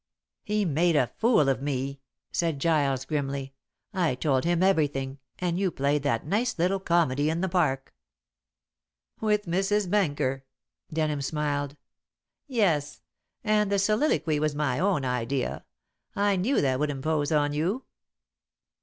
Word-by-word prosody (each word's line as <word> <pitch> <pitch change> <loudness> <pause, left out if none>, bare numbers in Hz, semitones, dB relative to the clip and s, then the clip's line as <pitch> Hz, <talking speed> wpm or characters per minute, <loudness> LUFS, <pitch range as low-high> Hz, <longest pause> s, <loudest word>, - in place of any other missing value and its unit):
"He 210 -1 0
made 165 +1 +2
a 125 -4 +2
fool 225 - +4
of 135 -1 +1
me," 140 -1 -3 0.3
said 165 -4 0
Giles 140 -4 +1
grimly. 140 -2 -3 0.4
"I 175 -9 +1
told 135 0 +1
him 175 +1 +2
everything, 140 -7 +1 0.2
and 180 0 -1
you 195 -1 +2
played 140 -1 0
that 115 -5 0
nice 220 +10 0
little 185 +3 +1
comedy 155 -6 +2
in 165 +2 -1
the 190 - +1
park." 155 -7 0 1.3
"With 210 -1 +1
Mrs. 195 +3 +1
Benker?" 145 -9 0 0.5
Denham 155 -2 0
smiled. 145 0 -2 0.7
"Yes; 185 - 0 0.4
and 210 -2 +2
the 200 - +3
soliloquy 200 - +2
was 155 -1 0
my 145 -4 0
own 180 -7 +1
idea. 125 +1 -2 0.5
I 200 0 +2
knew 210 +10 +1
that 130 -2 +1
would 150 0 +1
impose 145 +2 -1
on 145 -1 +2
you." 180 - -1
155 Hz, 135 wpm, -27 LUFS, 140-190 Hz, 1.3 s, fool